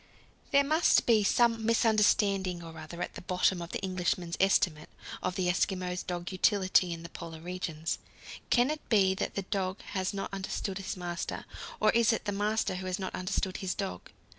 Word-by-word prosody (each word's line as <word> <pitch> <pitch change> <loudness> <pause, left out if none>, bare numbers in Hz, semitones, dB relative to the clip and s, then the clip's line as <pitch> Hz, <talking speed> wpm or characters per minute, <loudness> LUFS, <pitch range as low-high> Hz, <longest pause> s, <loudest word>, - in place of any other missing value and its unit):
There 280 0 +5
must 310 +4 +4
be 220 -3 +4
some 230 +1 +3
misunderstanding 205 -5 +2
or 165 -1 -9
other 170 +3 -6
at - - -6
the - - -8
bottom 180 0 +1
of 170 - -6
the 195 - -3
Englishmen's 180 -2 -1
estimate 175 -5 +2 0.3
of 185 - -2
the 185 -1 0
Eskimo 180 0 0
dog's 175 0 -3
utility 185 -2 +3
in 165 0 -5
the 170 - -8
Polar 165 -1 -8
regions. 165 -2 -3 0.5
Can 245 +3 +4
it 305 - -4
be 195 -4 +4
that 190 - -3
the 195 - -2
dog 190 -1 -2
has 190 -1 0
not 195 -1 -5
understood 195 0 -3
his 195 - -4
master? 175 -1 -4 0.3
Or 215 - +4
is 230 0 +4
it 225 - -2
the 205 - 0
master 205 -1 0
who 185 0 -5
has 185 0 -1
not 190 -2 -4
understood 185 0 -2
his 190 -1 -3
dog? 90 -1 -5
190 Hz, 190 wpm, -30 LUFS, 180-205 Hz, 0.5 s, There